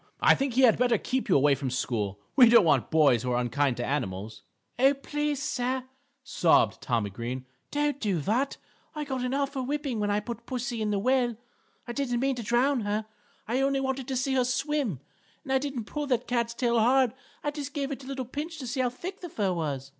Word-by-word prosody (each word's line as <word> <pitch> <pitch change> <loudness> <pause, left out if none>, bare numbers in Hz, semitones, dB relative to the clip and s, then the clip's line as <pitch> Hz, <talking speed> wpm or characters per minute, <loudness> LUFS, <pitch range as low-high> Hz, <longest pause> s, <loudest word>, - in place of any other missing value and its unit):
I - - +6
think 270 -3 -1
he 265 - +4
had 230 -3 +5
better 245 -2 +3
keep 255 +3 -2
you - - +5
away 140 +1 +5
from 135 -1 -2
school. 110 -6 -2 0.2
We 245 -4 +8
don't 235 -5 +7
want 160 - +3
boys 145 -7 +4
who 125 0 -2
are 120 - +2
unkind 125 +2 0
to 120 - -2
animals." 110 -6 -3 0.4
"Oh, 270 +2 +5
please 295 +1 -2
sir," 260 -3 -1 0.4
sobbed 160 - +3
Tommy 115 -5 -1
Green, 120 +5 -5 0.2
"don't 290 -1 0
do 200 -8 0
that. 240 - 0 0.4
I 300 - -2
got 265 -3 -3
an 250 +2 -1
awful 275 -1 -1
whipping 275 -3 -2
when 205 0 0
I 205 0 +2
put 235 +2 -7
pussy 245 -2 -3
in 215 - 0
the 205 - +1
well; 245 +1 +1 0.5
I - - -3
didn't 245 -3 -1
mean 270 +2 +1
to - - -3
drown 245 +5 +2
her, 210 0 -2 0.4
I 245 +4 0
only 275 0 +2
wanted 265 -1 -2
to 265 - -2
see 265 +2 0
her 260 -1 +3
swim. 250 - -1 0.4
And 270 -3 -2
I 265 - +4
didn't 270 -5 -4
pull 295 +5 -4
this 250 -3 +1
cat's 235 -1 -1
tail 235 -1 +2
hard. 250 +1 +4 0.3
I 295 - 0
just 290 -1 -6
gave 280 -1 -2
it 275 0 -5
a - - -11
little 265 -2 -4
pinch 300 +6 -5
to 270 - -6
see 250 +2 -3
how 250 - +2
thick 355 +10 -8
the 350 - -6
fur 200 -9 0
was." 140 -5 -3
245 Hz, 225 wpm, -28 LUFS, 190-275 Hz, 0.5 s, We